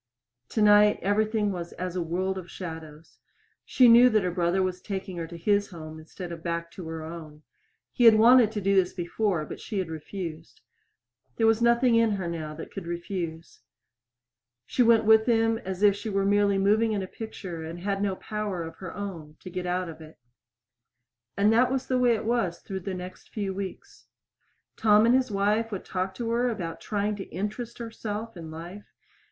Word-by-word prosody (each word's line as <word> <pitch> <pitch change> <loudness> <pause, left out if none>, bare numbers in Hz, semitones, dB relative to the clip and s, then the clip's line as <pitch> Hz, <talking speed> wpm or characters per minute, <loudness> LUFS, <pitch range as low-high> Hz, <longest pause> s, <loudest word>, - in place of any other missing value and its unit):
Tonight 210 -1 +5
everything 210 +1 +1
was 175 -2 -6
as 180 0 -5
a 180 - -1
world 185 +3 -1
of 175 -2 -11
shadows. 160 -3 -9 0.4
She 255 - +4
knew 240 +2 +8
that 215 -4 +2
her 180 - -1
brother 175 +1 +1
was 185 -1 -3
taking 190 -2 -5
her 165 -1 -4
to 170 +1 -9
his 200 +4 +1
home 160 -3 -9
instead 170 +3 -9
of 165 -1 -7
back 170 0 -3
to 180 -4 -9
her 160 -1 -5
own. 155 -2 -9 0.5
He 245 - +2
had 225 -1 +9
wanted 230 0 +6
to 210 - -3
do 195 +1 +2
this 185 -2 +3
before, 175 -1 -1
but - - -8
she 215 - -5
had 185 -4 -2
refused. 160 0 -7 0.7
There 225 - +1
was 225 0 +3
nothing 235 +1 +4
in 230 0 +4
her 190 -3 -3
now 155 -2 -5
that 160 - -9
could 195 -4 -7
refuse. 170 -1 -5 1.1
She 250 - 0
went 230 -2 +5
with 220 +1 +5
him 225 -1 +2
as 190 -2 -5
if 205 -1 +6
she 210 +2 -5
were 195 -1 0
merely 200 0 +3
moving 215 +3 +3
in 200 -2 -1
a - - -5
picture 185 -6 -7
and 165 +2 -7
had 195 +1 -1
no 200 -2 0
power 210 -4 -4
of 165 0 -9
her 185 -3 -8
own 165 -7 -7
to 185 - -9
get 180 0 -4
out 180 0 -1
of 160 -1 -9
it. 155 0 -13 1.2
And 205 +2 +4
that 250 +3 +4
was 265 -1 -1
the 255 -1 0
way 245 -2 +4
it 215 - -5
was 225 -7 0
through 190 -2 -5
the 190 +1 -5
next 180 0 -9
few 200 -3 -3
weeks. 195 -1 -8 0.7
Tom 215 0 +5
and 235 - +4
his 260 -1 +2
wife 210 +3 0
would 195 - -5
talk 190 0 -3
to 230 -1 -3
her 240 +2 +1
about 175 -8 -5
trying 210 0 -1
to 195 - -6
interest 215 +6 -5
herself 225 -1 -6
in 165 -2 -8
life. 170 +6 -9
195 Hz, 200 wpm, -27 LUFS, 170-220 Hz, 1.2 s, had